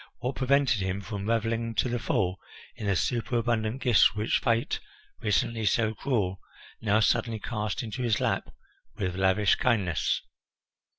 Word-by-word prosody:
What 125 Hz, +2 st, -3 dB
prevented 135 Hz, -4 st, +2 dB
him 95 Hz, +1 st, -2 dB
from 100 Hz, 0 st, -5 dB
revelling 115 Hz, 0 st, 0 dB
to -, -, +2 dB
the 120 Hz, 0 st, -1 dB
full 90 Hz, -3 st, 0 dB, 0.4 s
in 105 Hz, -, -5 dB
the 100 Hz, -, +2 dB
superabundant 120 Hz, +2 st, 0 dB
gifts 115 Hz, -3 st, +5 dB
which 105 Hz, +1 st, +1 dB
Fate, 115 Hz, 0 st, 0 dB, 0.4 s
recently 110 Hz, +1 st, 0 dB
so 110 Hz, +2 st, +2 dB
cruel, 105 Hz, -6 st, -1 dB, 0.4 s
now 110 Hz, -1 st, +3 dB
suddenly 115 Hz, 0 st, +1 dB
cast 105 Hz, +1 st, -3 dB
into 115 Hz, +2 st, -5 dB
his 115 Hz, -4 st, +1 dB
lap -, -, -1 dB, 0.4 s
with 90 Hz, -2 st, -2 dB
lavish 95 Hz, +2 st, +3 dB
kindness? 100 Hz, -, +1 dB
110 Hz, 140 wpm, -28 LUFS, 100-120 Hz, 0.4 s, gifts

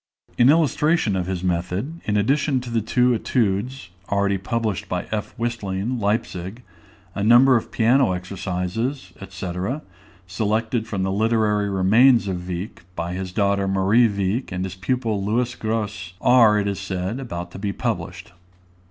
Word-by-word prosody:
In 120 Hz, +2 st, +5 dB
illustration 155 Hz, -, +2 dB
of 90 Hz, -1 st, -2 dB
his 95 Hz, -1 st, -3 dB
method, 90 Hz, -, -2 dB
in 105 Hz, -1 st, +1 dB
addition 135 Hz, +5 st, +2 dB
to 120 Hz, -1 st, -8 dB
the 115 Hz, -1 st, +1 dB
two 125 Hz, +3 st, +2 dB
Etudes, 110 Hz, -1 st, -1 dB, 0.2 s
already 100 Hz, -1 st, +1 dB
published 110 Hz, -1 st, -2 dB
by 90 Hz, -1 st, -2 dB
F. 105 Hz, -1 st, -3 dB
Whistling, 115 Hz, 0 st, -2 dB
Leipzig, 105 Hz, 0 st, -2 dB, 0.5 s
a 100 Hz, -, -3 dB
number 120 Hz, +4 st, +6 dB
of 115 Hz, -, -1 dB
piano 125 Hz, 0 st, +3 dB
exercises, 95 Hz, +5 st, -3 dB, 0.2 s
&c., 95 Hz, -1 st, -5 dB, 0.7 s
selected 110 Hz, +4 st, -1 dB
from 100 Hz, -3 st, -2 dB
the 95 Hz, -, 0 dB
literary 105 Hz, -1 st, +1 dB
remains 110 Hz, +5 st, +4 dB
of 90 Hz, -2 st, -4 dB
Wieck, 90 Hz, +3 st, -6 dB
by 85 Hz, +1 st, -3 dB
his 95 Hz, 0 st, -4 dB
daughter 100 Hz, 0 st, +1 dB
Marie 95 Hz, +5 st, +4 dB
Wieck 100 Hz, +4 st, -2 dB
and 90 Hz, 0 st, -2 dB
his 95 Hz, -, -5 dB
pupil 110 Hz, +1 st, -1 dB
Louis 120 Hz, +4 st, 0 dB
Grosse, 105 Hz, -5 st, -3 dB
are, 115 Hz, -4 st, +5 dB
it 100 Hz, -1 st, 0 dB
is 100 Hz, -1 st, -2 dB
said, 95 Hz, +4 st, -3 dB
about 90 Hz, -9 st, -6 dB
to 95 Hz, -, -9 dB
be 100 Hz, 0 st, -2 dB
published. 95 Hz, -4 st, -4 dB
105 Hz, 150 wpm, -22 LUFS, 95-120 Hz, 0.7 s, number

